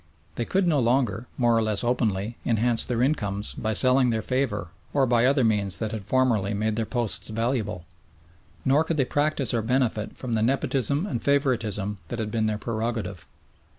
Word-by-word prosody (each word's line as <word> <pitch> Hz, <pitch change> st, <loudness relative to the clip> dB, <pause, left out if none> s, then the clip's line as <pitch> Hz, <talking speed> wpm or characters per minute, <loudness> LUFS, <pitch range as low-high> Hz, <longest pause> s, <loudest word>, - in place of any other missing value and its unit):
They 120 Hz, -, -3 dB
could 195 Hz, +7 st, +1 dB
no 160 Hz, -5 st, +2 dB
longer, 120 Hz, -2 st, +1 dB
more 120 Hz, -2 st, +3 dB
or 115 Hz, -, +3 dB
less 110 Hz, -1 st, +1 dB
openly, 115 Hz, -3 st, 0 dB
enhance 115 Hz, 0 st, +2 dB
their 120 Hz, -1 st, 0 dB
incomes 105 Hz, -8 st, -1 dB
by 110 Hz, 0 st, -2 dB
selling 130 Hz, +3 st, +4 dB
their 110 Hz, -2 st, -1 dB
favour 120 Hz, -9 st, -1 dB, 0.2 s
or 140 Hz, -2 st, +3 dB
by 120 Hz, 0 st, +3 dB
other 135 Hz, -1 st, +3 dB
means 100 Hz, -5 st, +1 dB
that 110 Hz, +4 st, -3 dB
had 110 Hz, -3 st, -5 dB
formerly 110 Hz, -4 st, +1 dB
made 110 Hz, +1 st, -1 dB
their 110 Hz, -1 st, -2 dB
posts 120 Hz, -4 st, -2 dB
valuable, 110 Hz, -5 st, -2 dB, 0.8 s
nor 140 Hz, +4 st, +4 dB
could 160 Hz, 0 st, -2 dB
they 135 Hz, -, +2 dB
practise 145 Hz, -3 st, 0 dB
or 115 Hz, -, +1 dB
benefit 115 Hz, -2 st, -1 dB
from 125 Hz, -3 st, -4 dB
the 110 Hz, -, +1 dB
nepotism 135 Hz, -, 0 dB
and 130 Hz, -, -3 dB
favouritism 110 Hz, -8 st, 0 dB
that 120 Hz, -, -5 dB
had 110 Hz, -2 st, -3 dB
been 110 Hz, -1 st, 0 dB
their 105 Hz, -1 st, -1 dB
prerogative. 110 Hz, -4 st, -4 dB
115 Hz, 185 wpm, -25 LUFS, 105-130 Hz, 0.8 s, selling